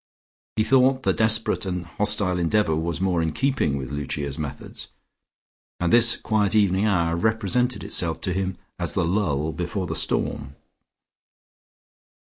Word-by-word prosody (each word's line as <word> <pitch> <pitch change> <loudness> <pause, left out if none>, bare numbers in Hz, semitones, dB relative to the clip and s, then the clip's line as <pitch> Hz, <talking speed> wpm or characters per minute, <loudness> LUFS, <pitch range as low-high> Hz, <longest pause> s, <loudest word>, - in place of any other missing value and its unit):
He 110 - +2
thought 130 +2 +3
the - - +2
desperate 110 0 +1
and 90 -2 -4
hostile 100 0 +1
endeavour 85 0 +1
was 85 +1 -3
more 90 -3 0
in 80 -1 -2
keeping 135 - 0
with 65 -1 -6
Lucia's 70 0 -3
methods, 75 -3 -7 0.9
and 90 -1 0
this 120 0 +7
quiet 105 -1 0
evening 100 0 +2
hour 85 -5 +1
represented 110 +4 0
itself 80 -2 0
to 90 - -2
him 95 0 -3 0.2
as - - -1
the - - 0
lull 80 -5 -1
before 90 +5 -4
the 80 -1 -4
storm. 70 -2 -1
95 Hz, 140 wpm, -23 LUFS, 80-110 Hz, 0.9 s, this